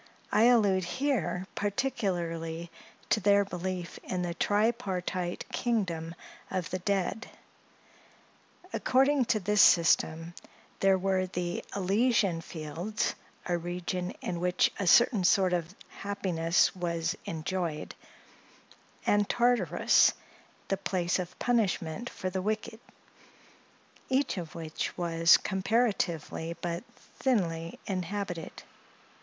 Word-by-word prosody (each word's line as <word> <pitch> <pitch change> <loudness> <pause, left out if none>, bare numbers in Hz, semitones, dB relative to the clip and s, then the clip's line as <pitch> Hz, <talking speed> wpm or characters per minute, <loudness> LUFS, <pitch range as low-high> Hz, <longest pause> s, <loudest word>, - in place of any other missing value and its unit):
I 215 - +5
allude 205 -6 +4
here 185 - -1
particularly 175 -7 -2 0.4
to - - +4
their 200 0 +4
belief 180 -1 -5
in 180 -1 -3
the 175 -1 -2
tripartite 195 -3 -1
kingdom 175 -9 -1 0.3
of 180 -3 -3
the 185 - -2
dead. 200 +4 -1 1.4
According 270 +1 +3
to 220 -1 +1
this 210 +1 +3
system, 165 -1 +4 0.5
there 195 -1 +4
were 190 0 0
the 175 -1 -3
Elysian 200 -2 +2
fields, 165 +7 -3 0.3
a 175 - 0
region 180 +1 -3
in 175 - -3
which 180 0 +2
a 195 - -1
certain 225 +1 +5
sort 185 0 +4
of 175 +2 -2
happiness 185 -5 0
was 170 0 -1
enjoyed; 165 -1 -3 1.1
and 205 0 +2
Tartarus, 235 -9 +4 0.6
the 195 - +1
place 185 -2 -1
of 180 -1 -6
punishment 225 -3 0
for 185 - -4
the 190 0 -2
wicked; 215 +2 -3 1.3
each 265 -6 +1
of 165 -3 -8
which 160 -1 -4
was, 165 -1 +5
comparatively, 190 -6 -1
but 170 +1 -3
thinly 170 -10 -2
inhabited. 185 -2 -4
185 Hz, 105 wpm, -29 LUFS, 170-205 Hz, 1.4 s, I